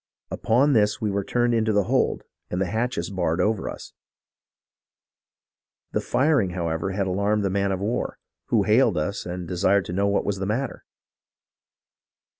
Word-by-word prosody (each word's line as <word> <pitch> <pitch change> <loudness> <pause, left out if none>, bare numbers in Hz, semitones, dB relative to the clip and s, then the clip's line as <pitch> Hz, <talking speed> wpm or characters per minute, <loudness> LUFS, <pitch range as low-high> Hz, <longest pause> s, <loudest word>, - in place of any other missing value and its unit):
Upon 135 +6 +2
this, 105 -3 +2
we 110 -3 -1
were 100 0 -1
turned 120 +3 +1
into 110 -1 +2
the 105 -1 +3
hold - - +1 0.3
and 90 - -2
the 95 - +1
hatches 110 -2 -2
barred 90 -3 -1
over 105 +2 0
us. - - -9 2.0
The - - 0
firing, 140 -8 +2
however, 85 +1 -1
had 100 0 0
alarmed 100 +2 0
the 95 - 0
man 100 0 0
of 95 - -1
war, 110 +4 -2 0.3
who - - +2
hailed - - +3
us - - -2
and 90 0 -5
desired 95 +2 +2
to 85 - -5
know 100 +2 +1
what 100 - +1
was 100 -1 -1
the 95 - -2
matter. 125 +6 -3
100 Hz, 165 wpm, -24 LUFS, 95-110 Hz, 2.0 s, the